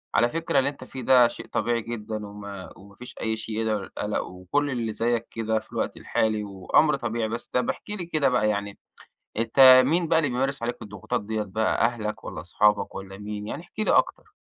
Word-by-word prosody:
على 120 +1 +4
فكرة 165 -3 +1
اللي 135 - +2
أنت 140 -2 -10
فيه 130 0 -8
ده 125 -1 +6
شيء - - -9
طبيعي 120 -1 0
جدًا، 110 -2 -5
وما 100 -2 -9
وما 100 +1 -16
فيش 125 - -11
أي 110 0 -1
شيء 110 - -5
يدعو 110 -2 0
للقلق، 105 +1 -3
وكل 90 +11 -2
اللي 120 -4 -2
زيك 115 +1 -1
كده 110 -1 -1
في - - -19
الوقت - - -2
الحالي 110 -1 0
وأمر 100 +10 +2
طبيعي، 115 -3 -2
بس 115 +1 -4
طب 125 -1 0
احكِ - - -5
لي 205 -4 -4
كده 155 -5 +1
بقى 110 -4 +2
يعني، 100 -1 -3 0.6
أنت 130 +3 +7
مين 165 +3 +1
بقى 160 0 +4
اللي 145 -4 +1
بيمارس 135 +1 -1
عليك 120 +1 -2
الضغوطات 105 +3 -4
ديَّة 110 0 -1
بقى 110 +3 +1
أهلك 110 -3 -3
والَّا - - -6
اصحابك 100 +3 +1
والَّا 95 0 -8
مين؟ 105 0 -6
يعني 160 - -5
احكِ 210 - -15
لي 215 - +2
أكتر. - - +1
115 Hz, 205 wpm, -25 LUFS, 105-130 Hz, 0.6 s, أنت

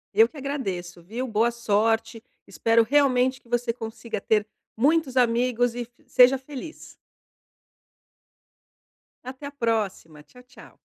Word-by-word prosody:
Eu 225 +3 +6
que 310 - -15
agradeço, 190 -12 -5
viu? 235 +8 -5
Boa 230 +1 +1
sorte, 225 0 0 0.2
espero 230 0 +2
realmente 260 0 +2
que 235 - -24
você 240 -1 0
consiga 225 -2 -6
ter 210 -1 +1 0.3
muitos 280 +1 +2
amigos 245 0 +2
e 245 - -3
f 240 +1 -8 0.2
seja 255 +2 +6
feliz. 285 +4 -10 2.3
Até 260 +3 -7
a - - -8
próxima, 215 - -2
tchau 250 +10 -18
tchau. 250 +1 -17
235 Hz, 125 wpm, -25 LUFS, 225-260 Hz, 2.3 s, Eu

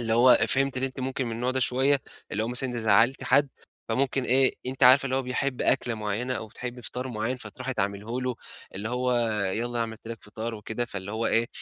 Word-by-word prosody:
اللي 115 -1 -1
هو 125 +2 +7
فهمتِ 135 0 +2
إن 130 - -2
أنتِ 135 0 -3
ممكن 130 0 -2
من 115 - -3
النوع 120 +3 -1
ده 130 0 -1
شوية 130 +5 +2 0.3
اللي 105 - 0
هو 115 - -2
مثلًا 125 -1 +1
زعّلتِ 115 +4 +3
حد، 140 +1 +4 0.4
فممكن 130 +2 0
إيه، 130 +1 +3
أنتِ 130 0 -2
عارفة 130 +2 +8
اللي 130 0 -1
هو 135 - 0
بيحب 125 +1 -2
أكلة 120 - +2
معيّنة 110 +4 -2
أو 110 - -5
بتحب 125 +3 -7
فطار 125 +2 -4
معيّن، 115 +2 -2
فتروحي 125 +3 -6
تعمليهُ 100 +5 -2
له، 125 -1 -2 0.4
اللي 105 +3 -4
هو 125 +1 0 0.4
يالّا 120 +1 -2
عملت 110 -1 -5
لك 115 -1 -7
فطار 110 +2 -5
وكده، 110 +3 -3
فاللي 100 -3 -6
هو 115 +1 -1
إيه، 115 +1 +2
125 Hz, 210 wpm, -27 LUFS, 110-130 Hz, 0.4 s, عارفة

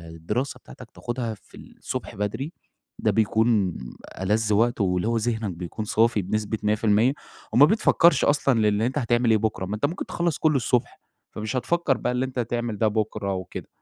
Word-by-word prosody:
الدراسة 120 +12 -3
بتاعتك، 120 -3 -13
تاخدها 120 -2 -4
في 100 - -17
الصبح - - -7
بدري، 105 +9 -3 0.5
ده - - +2
بيكون 110 -4 +2 0.5
ألذ 105 +2 +1
وقت، 115 +1 +2
واللي 90 +1 +1
هو 115 0 +1
ذهنك 110 -2 -1
بيكون 90 +5 -6
صافي 115 0 +2
بنسبة 110 +3 -2
100%، 105 +3 +3 0.4
وما 140 - +8
بتفكرش 175 -2 +4
أصلًا 140 -4 +2
للي 105 +1 +2
أنت 130 +4 -2
هتعمل 120 -3 +2
إيه 110 - +5
بُكرة، 105 -3 -2
ما 100 +3 -3
أنت 110 - 0
ممكن 170 +6 -3
تخلص 170 -3 -1
كله 155 -2 +2
الصبح، 125 -1 0 0.3
فمش 110 +4 -4
هتفكر 145 +2 +1
بقى - - -1
اللي 125 +1 0
أنت 130 -1 -5
هتعمل 120 -2 -2
ده 110 - +2
بُكرة 105 -2 -1
وكده. 95 -1 -6
110 Hz, 175 wpm, -24 LUFS, 105-125 Hz, 0.5 s, وما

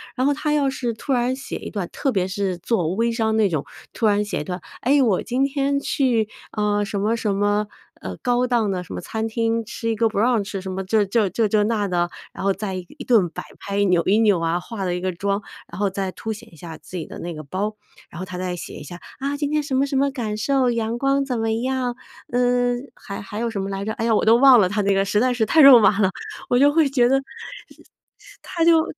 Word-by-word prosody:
然 260 +2 +1
后 290 - +3
他 300 +1 -1
要 285 -2 +2
是 245 -3 -3
突 270 +5 -3
然 250 +1 +1
写 275 - -7
一 - - -8
段 195 -5 -3
特 270 - -1
别 185 -3 0
是 190 -2 -2
做 180 -5 0
微 230 +1 +1
商 220 -1 0
那 215 - +4
种， 155 -4 -2 0.3
突 225 - -1
然 205 0 +3
写 205 - -3
一 - - -4
段： 180 +2 -5 0.2
哎， 275 +3 +3
我 215 -7 +2
今 255 +3 0
天 280 0 0
去， 245 -6 +1 0.2
呃， 210 -1 0
什 200 -1 -3
么 215 +3 +1
什 210 -3 -1
么， 205 +1 +1 0.3
呃， - - -6
高 245 0 +1
档 235 -4 +1
的 180 -1 -3
什 - - -10
么 - - -4
餐 220 0 -3
厅， 230 0 0
吃 230 +1 -4
一 225 - 0
个 225 +1 +2
brunch。 225 +4 +2 0.3
什 190 0 -6
么 190 +1 -3
这 205 +2 +2
这 205 -1 +1
这 225 +2 +1
这 210 0 +2
那 210 -2 0
的， 175 -1 0 0.2
然 - - -7
后 195 - +3
再 195 0 -4
一 185 -1 -6
一 275 - -7
顿 215 -10 +3
摆 - - -7 0.2
拍， 200 0 -1
扭 180 -3 +3
一 205 +3 +3
扭 205 -6 +4
啊， 165 +1 0
化 200 +2 -6
了 180 -1 -1
一 - - -3
个 185 0 -1
妆， 200 +3 -1 0.3
然 - - -8
后 200 -1 +2
再 190 -1 -3
凸 220 +3 -5
显 225 0 -13
一 - - -14
下 165 0 -9
自 185 - -9
己 165 - -4
的 - - -10
那 175 0 -5
个 155 0 -8
包。 200 +8 -3 0.3
然 170 - -10
后 185 - -4
她 180 -1 -7
再 180 -1 -3
写 - - -8
一 - - -8
下： 175 +4 -9 0.2
啊， 280 +1 -2
今 290 -1 -1
天 305 0 +2
什 280 -2 -2
么 270 +2 +3
什 275 - -4
么 280 +1 +3
感 225 -6 -3
受， 255 +2 +2
阳 230 0 -1
光 275 +2 +1
怎 250 -4 -2
么 225 0 0
样， 250 +1 -1 0.4
嗯。 245 0 +1
还 200 - -8
还 205 +2 -7
有 235 0 -1
什 200 -3 -3
么 195 - -4
来 195 0 -4
着， 220 - -2
哎 225 -1 -3
呀， 230 - +3
我 - - +1
都 225 +2 +6
忘 260 -2 +8
了 185 - +4
她 210 +2 0
那 200 0 +2
个 195 0 +2
实 205 - +1
在 250 +2 +2
是 225 -2 +1
太 315 +8 +4
肉 270 -4 +10
麻 205 0 +4
了， 190 -2 +4 0.4
我 245 - +3
就 285 +1 +6
会 310 -2 +3
觉 245 -3 +3
得 270 +1 +2 1.2
她 335 - -2
就 325 -1 +5
220 Hz, 290 characters per minute, -22 LUFS, 195-250 Hz, 1.2 s, 肉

